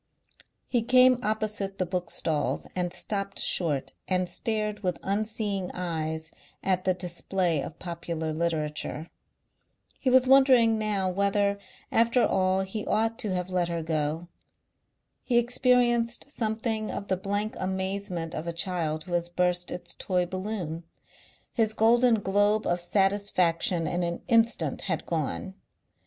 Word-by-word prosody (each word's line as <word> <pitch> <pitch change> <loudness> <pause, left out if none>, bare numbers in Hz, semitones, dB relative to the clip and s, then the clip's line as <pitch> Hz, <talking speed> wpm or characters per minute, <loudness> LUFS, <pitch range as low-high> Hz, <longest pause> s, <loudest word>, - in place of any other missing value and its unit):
He 240 - +1
came 255 +1 +5
opposite 215 -2 -2
the 185 - 0
bookstalls 170 -3 -2
and 180 -1 -1
stopped 200 +1 -3
short 150 -7 0
and 185 -1 +1
stared 210 +3 -2
with 180 -4 -2
unseeing 205 -2 -1
eyes 160 -3 -3 0.3
at 185 -1 0
the 185 -1 +2
display 175 -2 0
of 150 - -7
popular 165 -2 -4
literature. 155 -1 -3 0.9
He 260 - +1
was 255 0 +5
wondering 255 -4 +6
now 205 -3 0
whether 200 +2 +1 0.3
after 235 +2 +4
all 185 0 +2
he 190 +3 -4
ought 225 +2 +1
to 210 - -1
have 180 0 -3
let 180 -1 +1
her 170 -1 -3
go. 160 +1 -2 0.9
He 240 - +1
experienced 240 0 +2
something 220 -2 -2
of 200 - -5
the 190 - +1
blank 205 +3 -2
amazement 190 -2 -3
of 155 +2 -5
a 170 - -2
child 165 -3 -1
who 175 - -7
has 170 0 0
burst 180 0 0
its 175 -1 -6
toy 180 -2 0
balloon. 185 -3 -4 0.7
His 220 -2 +1
golden 235 +2 +4
globe 205 +2 +2
of 175 - +1
satisfaction 185 -3 +1
in 175 +3 -1
an 170 0 -3
instant 230 -1 +2
had 160 -3 -1
gone. 165 +3 -2
190 Hz, 135 wpm, -27 LUFS, 175-215 Hz, 0.9 s, wondering